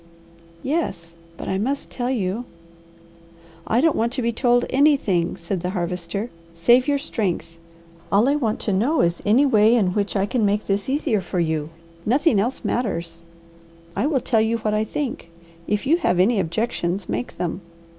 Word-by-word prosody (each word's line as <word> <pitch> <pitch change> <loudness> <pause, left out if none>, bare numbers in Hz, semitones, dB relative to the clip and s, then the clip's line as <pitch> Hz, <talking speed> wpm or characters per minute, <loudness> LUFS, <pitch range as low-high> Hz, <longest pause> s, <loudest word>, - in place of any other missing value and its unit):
"Yes. 260 - -2 0.2
But - - -7
I 190 - -1
must 275 +7 -2
tell 245 -1 -2
you 220 -1 -1 0.6
" 170 0 -25
"I - - +4
don't 325 +1 +3
want 230 +1 0
to 260 - -2
be 235 - +1
told 245 0 +2
anything," 260 - +2
said 180 +2 -3
the 180 - -3
Harvester. 180 +5 -3 0.2
"Save 240 - +4
your 285 -1 +2
strength. 180 - -3 0.6
All 205 +5 +4
I 280 - +3
want 230 -7 -1
to 205 - 0
know 250 +12 +2
is 170 0 0
any 240 +7 +5
way 225 -3 +5
in 190 -6 +2
which 205 +1 -1
I 195 -1 +2
can 235 +2 0
make 205 +1 +1
this 200 +4 -1
easier 265 -7 +1
for 180 0 -3
you. 160 -2 -1 0.3
Nothing 265 - +3
else 240 +6 -2
matters. 170 -8 -2 0.7
I 275 - +1
will 285 -4 +1
tell 225 -2 +2
you 225 +1 +1
what 215 -1 -1
I 215 0 +2
think; 250 - -4 0.4
if 210 +3 -1
you 315 +5 +4
have 180 - +1
any 205 +4 +3
objections, 180 0 -2
make 120 +3 -4
them. 175 +2 -3
210 Hz, 180 wpm, -22 LUFS, 175-250 Hz, 0.7 s, any